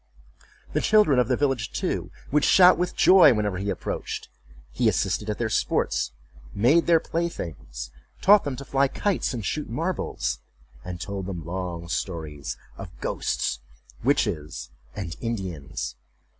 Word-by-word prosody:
The -, -, +1 dB
children 210 Hz, -12 st, +5 dB
of 125 Hz, -, +3 dB
the 125 Hz, -1 st, +1 dB
village, 135 Hz, -6 st, 0 dB
too, -, -, -2 dB, 0.2 s
would 150 Hz, +1 st, +3 dB
shout 180 Hz, -1 st, +7 dB
with 180 Hz, 0 st, -2 dB
joy 185 Hz, -9 st, +7 dB
whenever 105 Hz, -3 st, -1 dB
he 100 Hz, +1 st, -2 dB
approached. 95 Hz, -5 st, -4 dB, 0.4 s
He -, -, +2 dB
assisted 105 Hz, -, 0 dB
at 105 Hz, -, -1 dB
their 120 Hz, -, 0 dB
sports, 110 Hz, -, 0 dB, 0.4 s
made 130 Hz, +11 st, +4 dB
their 170 Hz, -1 st, +6 dB
playthings, 80 Hz, -, -4 dB, 0.3 s
taught 205 Hz, +1 st, +6 dB
them 140 Hz, -2 st, -3 dB
to 140 Hz, +2 st, -8 dB
fly 135 Hz, +1 st, +2 dB
kites 200 Hz, +7 st, -1 dB
and 115 Hz, -6 st, -4 dB
shoot 150 Hz, +10 st, -2 dB
marbles, 165 Hz, +10 st, -2 dB, 0.4 s
and 90 Hz, -1 st, -6 dB
told 100 Hz, -1 st, -4 dB
them 90 Hz, -5 st, -5 dB
long 85 Hz, -1 st, -4 dB
stories 80 Hz, -5 st, -4 dB, 0.2 s
of 95 Hz, -, -6 dB
ghosts, 65 Hz, -, -1 dB, 0.4 s
witches, 95 Hz, -, 0 dB, 0.2 s
and 85 Hz, -4 st, -5 dB
Indians. 90 Hz, -, -4 dB
105 Hz, 145 wpm, -25 LUFS, 85-145 Hz, 0.4 s, shout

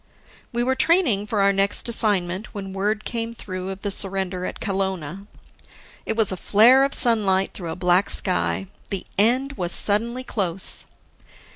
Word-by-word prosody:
We 240 Hz, 0 st, -1 dB
were 260 Hz, +2 st, +1 dB
training 265 Hz, -, +2 dB
for 210 Hz, -1 st, -1 dB
our 200 Hz, 0 st, +3 dB
next 195 Hz, +3 st, 0 dB
assignment, 205 Hz, -4 st, 0 dB
when 195 Hz, -2 st, -6 dB
word 210 Hz, +2 st, -2 dB
came 230 Hz, -1 st, -4 dB
through 185 Hz, -3 st, -6 dB
of 195 Hz, 0 st, -7 dB
the 205 Hz, -, -2 dB
surrender 190 Hz, -2 st, 0 dB
at -, -, -7 dB
Kelowna. 190 Hz, -2 st, -3 dB, 0.8 s
It -, -, -1 dB
was 220 Hz, -4 st, +4 dB
a 185 Hz, -, -4 dB
flare 235 Hz, +9 st, +5 dB
of 275 Hz, -, +1 dB
sunlight 200 Hz, -6 st, +3 dB
through 175 Hz, -4 st, -7 dB
a -, -, -4 dB
black 180 Hz, +1 st, +1 dB
sky. 85 Hz, +2 st, -1 dB, 0.2 s
The 195 Hz, -, -4 dB
end 255 Hz, +6 st, +2 dB
was 175 Hz, -1 st, -2 dB
suddenly 235 Hz, +7 st, +1 dB
close. 190 Hz, -6 st, -1 dB
200 Hz, 160 wpm, -22 LUFS, 185-230 Hz, 0.8 s, flare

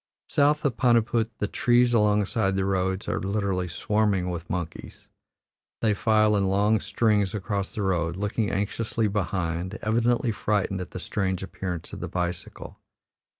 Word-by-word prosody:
South 150 Hz, +1 st, +2 dB
of 140 Hz, -, 0 dB
Paniput 115 Hz, -2 st, +3 dB
the 105 Hz, -, -1 dB
trees 120 Hz, +3 st, +3 dB
alongside 105 Hz, -1 st, +2 dB
the 95 Hz, 0 st, 0 dB
road 95 Hz, 0 st, -1 dB
are -, -, -1 dB
literally 95 Hz, -2 st, -1 dB
swarming 100 Hz, 0 st, 0 dB
with 85 Hz, 0 st, -6 dB
monkeys; 85 Hz, -3 st, -6 dB, 0.7 s
they 110 Hz, -2 st, +3 dB
file 110 Hz, 0 st, +3 dB
in 100 Hz, -1 st, +2 dB
long 105 Hz, +3 st, +3 dB
strings 105 Hz, -2 st, +1 dB
across 100 Hz, -1 st, -3 dB
the 105 Hz, -, -2 dB
road, 85 Hz, -3 st, 0 dB
looking 105 Hz, +2 st, -1 dB
anxiously 105 Hz, +2 st, -1 dB
behind, 95 Hz, -1 st, -2 dB
evidently 115 Hz, +2 st, +2 dB
frightened 100 Hz, -3 st, -1 dB
at 90 Hz, -, -6 dB
the -, -, -7 dB
strange 95 Hz, -2 st, -2 dB
appearance 90 Hz, -3 st, -5 dB
of -, -, -6 dB
the -, -, -4 dB
bicycle. 90 Hz, -1 st, -5 dB
100 Hz, 150 wpm, -26 LUFS, 95-110 Hz, 0.7 s, Paniput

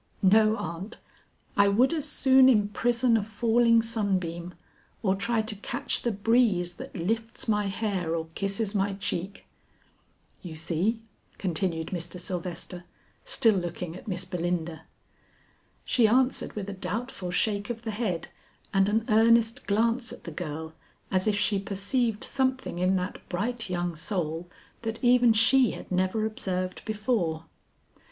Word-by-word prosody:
"No 215 Hz, +3 st, +5 dB
aunt, 170 Hz, +7 st, -6 dB, 0.6 s
I 200 Hz, 0 st, +5 dB
would 240 Hz, +9 st, +3 dB
as 305 Hz, -2 st, -1 dB
soon 265 Hz, -1 st, +6 dB
imprison 230 Hz, +2 st, +2 dB
a -, -, +1 dB
falling 230 Hz, +2 st, +3 dB
sunbeam 185 Hz, -6 st, -2 dB, 0.5 s
or 190 Hz, -3 st, +3 dB
try 220 Hz, +3 st, 0 dB
to 215 Hz, 0 st, 0 dB
catch 200 Hz, -, -2 dB
the 235 Hz, -, 0 dB
breeze 205 Hz, -4 st, +2 dB
that -, -, -9 dB
lifts 225 Hz, +7 st, -2 dB
my 210 Hz, -2 st, +1 dB
hair 190 Hz, -5 st, -1 dB
or 165 Hz, -1 st, -3 dB
kisses 200 Hz, +2 st, -1 dB
my 200 Hz, -1 st, +1 dB
cheek." 195 Hz, 0 st, -4 dB, 1.0 s
"You 170 Hz, -4 st, -8 dB
see," 180 Hz, +8 st, -1 dB, 0.3 s
continued 170 Hz, -3 st, -1 dB
Mr. 175 Hz, 0 st, -5 dB
Sylvester 180 Hz, -1 st, -5 dB, 0.4 s
still 270 Hz, -, +4 dB
looking 175 Hz, -2 st, -4 dB
at 185 Hz, -, -11 dB
Miss 185 Hz, -2 st, -2 dB
Belinda. 170 Hz, -2 st, -3 dB, 1.0 s
She 235 Hz, -3 st, +4 dB
answered 255 Hz, +4 st, +1 dB
with 205 Hz, -2 st, -5 dB
a 200 Hz, -, -4 dB
doubtful 195 Hz, +1 st, -4 dB
shake 205 Hz, +3 st, 0 dB
of 235 Hz, -1 st, -5 dB
the 225 Hz, -, -3 dB
head 205 Hz, -6 st, -2 dB, 0.5 s
and 195 Hz, 0 st, +3 dB
an 220 Hz, +2 st, +1 dB
earnest 230 Hz, +2 st, +3 dB
glance 230 Hz, +4 st, +1 dB
at -, -, -11 dB
the 170 Hz, -, -7 dB
girl 160 Hz, -1 st, -5 dB, 0.4 s
as 185 Hz, +1 st, +1 dB
if 210 Hz, -1 st, +2 dB
she 205 Hz, -1 st, +1 dB
perceived 210 Hz, +3 st, 0 dB
something 260 Hz, -8 st, -1 dB
in 185 Hz, +1 st, +2 dB
that 185 Hz, +1 st, -3 dB
bright 225 Hz, +4 st, -2 dB
young 175 Hz, -1 st, -2 dB
soul, 170 Hz, -1 st, -3 dB, 0.3 s
that 225 Hz, -1 st, -3 dB
even 245 Hz, -1 st, +6 dB
she 225 Hz, +2 st, +4 dB
had -, -, -10 dB
never 185 Hz, +4 st, +1 dB
observed 185 Hz, -5 st, -3 dB
before. 210 Hz, -7 st, -1 dB
205 Hz, 145 wpm, -27 LUFS, 180-225 Hz, 1.0 s, soon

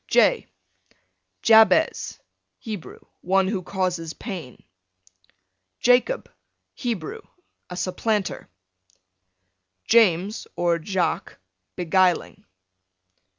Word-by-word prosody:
J -, -, +3 dB, 1.0 s
Jabez, 225 Hz, +8 st, +4 dB, 0.4 s
Hebrew, 215 Hz, -7 st, -8 dB, 0.2 s
one 190 Hz, +1 st, +2 dB
who 195 Hz, -2 st, -2 dB
causes 180 Hz, -3 st, -2 dB
pain. 180 Hz, -, -8 dB, 1.2 s
Jacob, 250 Hz, -, +2 dB, 0.5 s
Hebrew, 255 Hz, -, -4 dB, 0.5 s
a 180 Hz, -, -7 dB
supplanter. 195 Hz, +2 st, -2 dB, 1.4 s
James, 205 Hz, -3 st, +3 dB
or 170 Hz, -1 st, +1 dB
Jaques, 185 Hz, +2 st, -2 dB, 0.4 s
beguiling. 180 Hz, 0 st, +1 dB
190 Hz, 65 wpm, -24 LUFS, 180-225 Hz, 1.4 s, Jabez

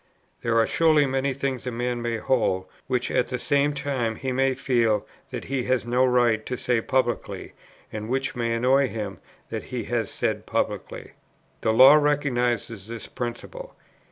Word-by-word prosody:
There 115 Hz, -1 st, +1 dB
are 115 Hz, -, +5 dB
surely 155 Hz, -3 st, +4 dB
many 135 Hz, +1 st, 0 dB
things 130 Hz, -2 st, -3 dB
a -, -, -1 dB
man 120 Hz, 0 st, -2 dB
may 120 Hz, -1 st, -1 dB
hold, 110 Hz, -6 st, +1 dB, 0.2 s
which 125 Hz, -1 st, -1 dB
at -, -, +2 dB
the 125 Hz, -, -3 dB
same 145 Hz, +3 st, +2 dB
time 135 Hz, -5 st, -2 dB
he 130 Hz, +3 st, -3 dB
may 135 Hz, +1 st, +1 dB
feel 115 Hz, -6 st, +1 dB, 0.2 s
that -, -, -5 dB
he 135 Hz, -2 st, -2 dB
has 130 Hz, -2 st, +1 dB
no 125 Hz, +2 st, +2 dB
right 120 Hz, -3 st, +3 dB
to 125 Hz, -, -3 dB
say 120 Hz, -1 st, +1 dB
publicly, 120 Hz, -1 st, -1 dB, 0.4 s
and 110 Hz, 0 st, -5 dB
which 135 Hz, +2 st, 0 dB
it -, -, -12 dB
may 115 Hz, -1 st, 0 dB
annoy 130 Hz, +3 st, +3 dB
him 105 Hz, -5 st, -5 dB, 0.3 s
that -, -, -4 dB
he -, -, -4 dB
has -, -, -1 dB
said -, -, -2 dB
publicly. -, -, -3 dB, 0.5 s
The 110 Hz, -, +2 dB
law 130 Hz, +5 st, +9 dB
recognizes 125 Hz, -8 st, +1 dB
this 115 Hz, -1 st, -6 dB
principle. 310 Hz, -, -6 dB
125 Hz, 175 wpm, -25 LUFS, 115-135 Hz, 0.5 s, law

